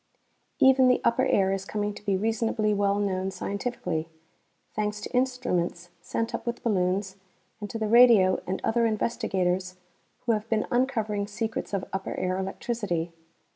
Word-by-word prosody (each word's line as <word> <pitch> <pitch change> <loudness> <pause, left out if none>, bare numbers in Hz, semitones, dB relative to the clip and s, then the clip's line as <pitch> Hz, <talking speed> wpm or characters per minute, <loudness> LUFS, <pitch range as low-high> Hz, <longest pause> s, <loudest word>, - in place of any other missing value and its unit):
Even 265 -2 +6
the 250 - +4
upper 255 +3 +2
air 195 -1 +3
is 195 -1 -2
coming 205 +1 -2
to - - -12
be 200 -2 +1
reasonably 220 0 0
well 200 0 +1
known 190 -2 -1
scientifically, 190 -6 -3 0.6
thanks 210 -1 -2
to 210 - -7
instruments 245 -9 -1
sent 230 0 -3
up - - -3
with 235 0 -3
balloons 190 -2 0 0.4
and 205 -1 -6
to 225 - -4
the 220 - -1
radio 225 -5 +6
and 190 - -2
other 235 0 +2
investigators 185 -4 -1 0.5
who 235 - +2
have 215 0 -1
been 220 -1 +1
uncovering 220 -5 0
secrets 220 +1 -4
of 195 -2 -2
upper 195 0 -3
air 185 +1 -1
electricity. 190 -3 -3
210 Hz, 155 wpm, -27 LUFS, 190-230 Hz, 0.6 s, Even